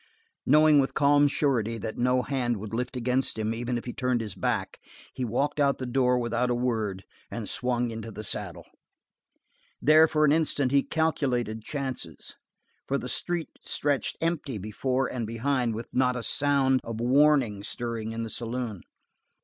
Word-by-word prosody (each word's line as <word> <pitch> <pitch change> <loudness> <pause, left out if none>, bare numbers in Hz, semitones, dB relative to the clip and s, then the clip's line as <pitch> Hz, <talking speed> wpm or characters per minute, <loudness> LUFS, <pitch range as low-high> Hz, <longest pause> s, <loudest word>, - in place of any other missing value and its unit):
Knowing 150 +1 +6
with 135 - 0
calm 145 0 +5
surety 120 -6 0
that 110 -1 -5
no 125 +1 +2
hand 125 -4 -1
would 105 +2 -7
lift 125 +2 -2
against 125 +1 0
him 110 0 -1
even 120 +1 -2
if 120 - -6
he 120 - -5
turned 125 -2 0
his 110 -4 -5
back, 95 -2 -2 0.3
he 130 - -4
walked 125 +6 -1
out 140 -1 +3
the 130 - -4
door 125 0 +2
without 120 +1 0
a 120 - +1
word 110 -6 -1 0.3
and - - -5
swung 125 -1 -1
into 110 0 -6
the 110 0 -7
saddle. - - -3 1.1
There, 155 +1 +6
for 155 -1 +2
an 145 - +4
instant, 145 -4 +2
he 140 0 +5
calculated 130 -9 -1
chances, 130 - -5 0.5
for - - +1
the - - -5
street 175 -2 -2
stretched 145 -2 0
empty 160 -7 -1
before 125 +6 -1
and 120 -3 -3
behind 120 0 0
with 115 +1 -5
not 125 -1 +2
a 125 - -4
sound 135 -2 +2
of 115 -1 -5
warning 130 -4 +3
stirring 115 +1 -4
in 115 0 -4
the 115 - -5
saloon. 115 -4 -4
125 Hz, 170 wpm, -27 LUFS, 115-140 Hz, 1.1 s, Knowing